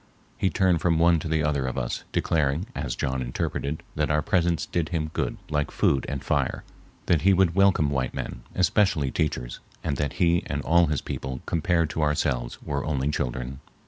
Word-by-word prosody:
He 95 - +1
turned 90 -4 +2
from 85 -2 +2
one 85 0 +4
to 80 - -5
the 80 -1 +1
other 70 -3 0
of 65 - -4
us, - - -3
declaring, 75 +1 +1
as - - -3
John 65 -1 -1
interpreted, 70 +4 -3
that 75 0 0
our 75 0 +2
presence 85 -5 +1
did 85 -2 -2
him 80 -3 -2
good - - -2
like 75 -2 0
food 65 -2 +1
and 70 -2 -4
fire, - - 0 0.4
that 85 -4 +3
he 95 +2 +5
would 95 -2 +3
welcome 95 -6 +4
white 65 -2 -1
men, - - -5
especially 90 -7 +2
teachers, - - -2 0.2
and 70 - -1
that 75 - -1
he 85 -2 +3
and 70 -1 -2
all 85 +1 +4
his 75 -1 -1
people 65 -1 -5
compared 85 -1 +1
to 80 - -2
ourselves 65 -5 0
were 70 -1 -2
only 70 -2 0
children. 65 -1 -3
75 Hz, 190 wpm, -26 LUFS, 70-85 Hz, 0.4 s, he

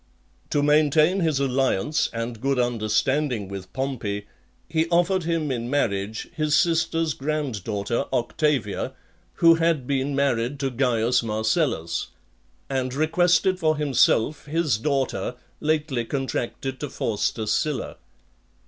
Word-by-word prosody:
XXVII. - - -37
To 145 - +1
maintain 155 +4 +4
his 160 -6 +1
alliance 135 0 +1
and 115 0 -5
good 135 0 +1
understanding 120 +1 0
with 95 -1 -8
Pompey, 120 -7 -3 0.4
he 160 0 0
offered 175 +1 +2
him 165 -4 0
in 120 -1 -3
marriage 110 -6 -1
his 155 -1 +1
sister's 165 -2 +2
grand 140 -8 -3
daughter 105 +2 -2
Octavia, 130 -2 0 0.4
who 165 0 +6
had 165 -5 +1
been 140 +1 -1
married 135 -1 0
to 135 -1 0
Caius 125 -1 +2
Marcellus; 110 - 0 0.6
and 130 -1 -2
requested 175 +4 +2
for 155 -2 +2
himself 145 -1 +2
his 150 -7 +1
daughter, 135 -1 -1 0.2
lately 150 -5 0
contracted 135 0 -3
to 145 - -4
Faustus 110 -2 -1
Sylla. 150 -3 -2
135 Hz, 120 wpm, -24 LUFS, 115-155 Hz, 0.6 s, who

